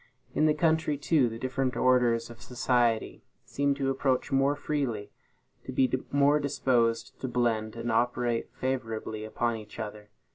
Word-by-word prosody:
In 155 - +3
the 150 - +3
country, 160 -2 +1
too, 145 -3 +2
the 115 - -7
different 130 +1 -1
orders 120 -2 +3
of 115 - -13
society 120 -2 0 0.2
seem 140 0 0
to 135 -1 0
approach 135 0 0
more 135 +1 +3
freely, 135 -8 -2 0.5
to - - -5
be 130 0 +2 0.2
more 145 +1 +4
disposed 130 -5 0
to 130 - -2
blend 115 -3 0
and 115 0 -3
operate 120 0 0
favorably 115 -4 -3
upon 115 +1 -1
each 105 -1 -11
other. 105 -1 -7
125 Hz, 150 wpm, -28 LUFS, 115-140 Hz, 0.5 s, more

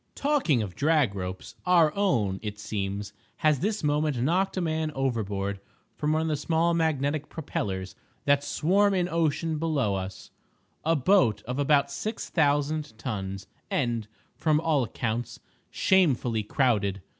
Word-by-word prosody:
Talking 270 - +2
of 95 -4 -7
drag 150 -7 +2
ropes—our 150 - +1
own, 115 - +1
it 105 -1 -5
seems, 100 -1 -4 0.2
has 155 -4 +2
this 210 +1 -1
moment 150 -2 +1
knocked 180 +10 +1
a - - +2
man 160 -2 -1
overboard 100 -7 -1 0.4
from 150 0 0
one 160 +1 +1
of - - -1
the 155 - +1
small 165 +3 +1
magnetic 150 -2 0
propellers 95 - -4 0.3
that 140 0 +3
swarm 195 +7 +2
in 180 -1 +1
ocean 165 -1 0
below 150 -10 0
us—a 95 +11 -5
boat 130 - +3
of 125 +3 -4
about 140 -1 +3
six 215 +10 -4
thousand 145 -4 +1
tons, 95 -5 -4 0.2
and, 120 -5 -1 0.3
from 155 -2 +2
all 155 -3 +2
accounts, 115 +1 -3 0.3
shamefully 130 - +2
crowded. 105 -5 0
145 Hz, 135 wpm, -27 LUFS, 105-160 Hz, 0.4 s, that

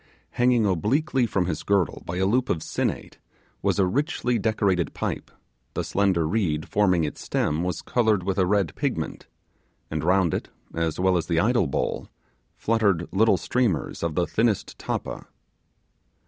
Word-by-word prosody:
Hanging 120 -2 +3
obliquely 120 - +1
from 95 -4 0
his 80 -3 -2
girdle 100 -4 +1
by 85 - -3
a 95 - +2
loop 125 +5 +1
of 80 - 0
sinnate - - -3 0.4
was - - +1
a 95 - +4
richly 125 +1 0
decorated 100 -5 0
pipe; - - -3 0.5
the - - -1
slender 95 -5 +1
reed 80 -6 0
forming 90 -5 +2
its 75 - -4
stem 75 +2 0
was 90 0 -2
coloured 110 -6 +2
with 95 +1 -1
a 90 - +3
red 100 -4 +1
pigment, - - -3 0.6
and 80 -1 -2
round 95 -3 +3
it, - - -3 0.2
as 80 -1 -1
well 95 0 +3
as 85 - -2
the 85 -2 +2
idol 115 -2 +2
bowl, 70 - -2 0.5
fluttered 100 -7 +1
little 105 0 +4
streamers 110 - -1
of 85 -2 -2
the 90 - +2
thinnest 110 -1 0
tappa. - - -4
95 Hz, 160 wpm, -25 LUFS, 85-110 Hz, 0.6 s, a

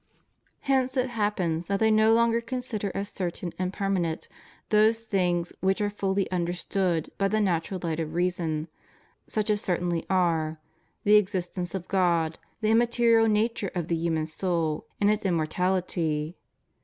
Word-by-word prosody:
Hence 265 -1 +1
it 255 0 +1
happens 185 -7 -1
that 200 0 0
they 220 0 +4
no 215 +1 +5
longer 235 0 +3
consider 235 -4 -3
as 200 +1 -2
certain 175 -1 -4
and 185 0 -1
permanent 190 -5 -1 0.4
those 220 +1 +4
things 180 -5 0
which 190 0 +1
are 205 -1 0
fully 195 -1 0
understood 175 -1 -1
by 195 - +3
the 215 +2 +1
natural 185 -1 0
Ught 165 -2 -2
of 160 0 -4
reason, 170 -3 -1 0.6
such 215 0 0
as 210 -1 0
certainly 175 -4 -1
are 165 -4 +1 0.2
— - - -43
the 210 +1 +6
existence 185 -2 -1
of 185 -2 -5
God, 170 -4 +1 0.2
the 215 0 +2
immaterial 230 -1 +4
nature 215 -1 +1
of 175 -2 -2
the 170 - +2
human 160 -1 0
soul, 160 -1 -2
and 205 0 +4
its 215 0 -1
immortality. 170 -2 0
190 Hz, 155 wpm, -27 LUFS, 170-215 Hz, 0.6 s, the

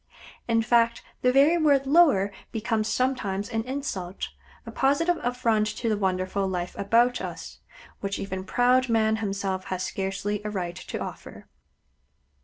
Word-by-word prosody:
In 230 -1 +2
fact, 235 0 +2 0.2
the 250 - +4
very 290 +6 +5
word 285 -3 +3
"lower" 275 - +4 0.2
becomes 220 -1 -1
sometimes 215 -6 -1
an 225 -1 -1
insult, 250 - -4 0.4
a - - -7
positive 310 +6 +2
affront 230 -4 +1
to 230 - -1
the 215 - +2
wonderful 190 0 -1
life 180 -1 -3
about 235 +5 +2
us, - - -7 0.4
which 200 0 -3
even 190 -1 -4
proud 250 +5 +2
Man 220 -1 +2
himself 195 -3 -3
has 185 -1 -3
scarcely 195 +2 -3
a 210 - -3
right 180 -4 -3
to - - -6
offer. - - -8
220 Hz, 145 wpm, -26 LUFS, 195-250 Hz, 0.4 s, very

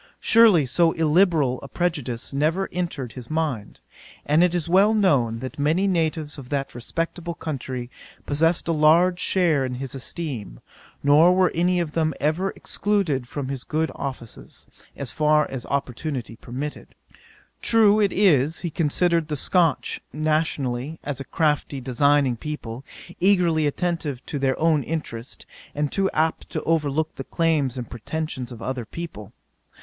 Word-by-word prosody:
Surely, 220 -10 +5
so 165 +6 +2
illiberal 160 -5 +2
a 140 - -8
prejudice 145 -9 -2
never 160 +7 +1
entered 160 -9 -3
his 125 -2 -10
mind: 150 -10 -2 0.5
and 155 +4 +4
it 180 -1 +2
is 170 -1 -1
well 195 +5 +4
known, 130 - +2
many 160 +7 +2
natives 160 -5 -1
of 125 -2 -11
that 140 -1 -2
respectable 165 +7 -3
country 130 -6 -5 0.4
possessed 165 +4 +1
a - - +2
large 165 +4 +4
share 170 -9 +2
in 130 -1 -3
his 130 0 -5
esteem; 130 - -5 0.4
nor 155 +6 +6
were 185 -2 +3
any 180 +2 +2
of 170 -3 -2
them 155 -2 0
ever 160 +6 0
excluded 185 -12 -1
from 135 0 -5
his 135 -2 -4
good 160 +1 -1
offices, 130 -5 -7 0.3
as 140 -3 -3
far 150 0 +3
as 130 -3 -6
opportunity 135 -3 -3
permitted. 130 +6 -7 0.7
True 215 -2 +5
it 205 -2 +3
is, 160 -6 +3
he 170 - -3
considered 165 +1 +1
the 150 - -2
Scotch, 165 +1 +1
nationally, 155 -2 -1
as 145 -2 -4
a - - -4
crafty, 150 -2 0
designing 135 0 +2
people, 130 -4 -6 0.4
eagerly 175 -5 +3
attentive 150 -4 -2
to 145 - -4
their 135 -1 0
own 160 -2 +3
interest, 130 -5 -5 0.3
and 150 0 -1
too 195 -1 +1
apt 160 +1 0
to - - -4
overlook 155 -1 0
the 135 - -4
claims 150 -5 0
and 120 -2 -5
pretentions 130 0 -5
of 120 -1 -9
other 130 -2 -3
people. 110 - -8
150 Hz, 150 wpm, -23 LUFS, 135-170 Hz, 0.7 s, nor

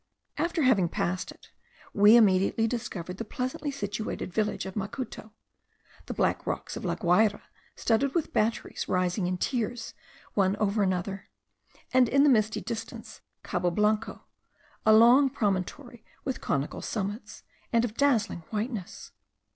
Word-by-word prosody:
After 335 0 0
having 205 -10 +3
passed 185 +3 -2
it, - - -18 0.4
we 205 +2 +7
immediately 205 0 +4
discovered 210 -7 -4
the 230 - -4
pleasantly 255 +6 -4
situated 210 -7 -4
village 210 -1 -1
of 190 - -6
Macuto; 215 +2 -5 0.8
the - - -4
black - - 0
rocks - - -3
of - - -6
La - - -1
Guayra, 205 +3 +2 0.3
studded 260 +6 +1
with 335 - -1
batteries 220 +2 -1
rising 180 +1 0
in 180 0 -1
tiers 240 +2 -2 0.4
one 195 -1 +2
over 210 0 0
another, 190 0 -2 0.6
and 255 -2 +5
in 275 +2 +4
the 295 - +6
misty 220 -4 +2
distance, 225 0 -7 0.2
Cabo 180 0 0
Blanco, 210 +4 0 0.6
a - - +8
long 245 +5 +7
promontory 220 +3 -3 0.2
with 265 -2 -3
conical 140 +1 -2
summits, 205 +1 -5 0.3
and 235 0 +3
of 220 - -5
dazzling 245 -10 +2
whiteness. 220 -3 -5
215 Hz, 140 wpm, -28 LUFS, 195-245 Hz, 0.8 s, a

